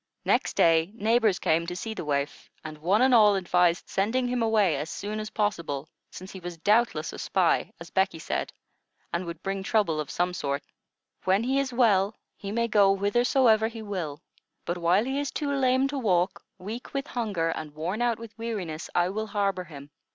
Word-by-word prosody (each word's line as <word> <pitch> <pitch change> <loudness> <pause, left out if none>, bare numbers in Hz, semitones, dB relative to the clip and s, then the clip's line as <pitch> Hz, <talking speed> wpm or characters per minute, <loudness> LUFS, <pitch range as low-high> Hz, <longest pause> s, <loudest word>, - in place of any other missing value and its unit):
Next - - +1
day, 165 +2 +4
neighbors 220 -2 +2
came 165 +1 +1
to 175 - -4
see 220 +5 -4
the - - -5
waif, 140 -1 -2
and 155 -1 -8
one 195 +9 +3
and 260 -1 +4
all 210 -3 +6
advised 180 -2 +2
sending 225 +6 0
him 245 -1 -1
away 215 -7 +3
as 150 +4 -4
soon 210 +1 -4
as 215 0 -5
possible, 170 -10 -2 0.2
since 185 +1 -10
he 190 - -8
was 175 -1 -7
doubtless 205 -4 +1
a - - -8
spy, 185 -4 +1
as 170 0 -10
Becky 190 -3 +1
said, 160 - -3 0.6
and 170 +1 -2
would 170 +1 -7
bring 195 0 -2
trouble 190 -6 +1
of 150 -2 -4
some 180 +1 0
sort. 140 -4 -2 0.6
"When 190 +4 +3
he 265 +3 +1
is 275 -2 -1
well, 215 -4 +3 0.2
he 200 - -7
may 235 +2 0
go 200 -3 +4
whithersoever 220 +2 +3
he 225 -1 -8
will; 175 -7 -5 0.4
but 175 +1 -2
while 175 +6 +3
he 270 +2 -1
is 285 -1 -2
too 285 -1 -2
lame 260 0 +2
to 280 -1 -3
walk, 185 -6 +1
weak 220 +9 -8
with 275 0 -1
hunger, 205 - -1
and 155 -2 -5
worn 180 +9 -3
out 240 -2 +1
with 230 -1 -11
weariness, 190 -9 -4
I 175 0 +3
will 215 +3 -3
harbor 200 -3 -1
him. 145 -3 -11
195 Hz, 195 wpm, -27 LUFS, 170-225 Hz, 0.6 s, all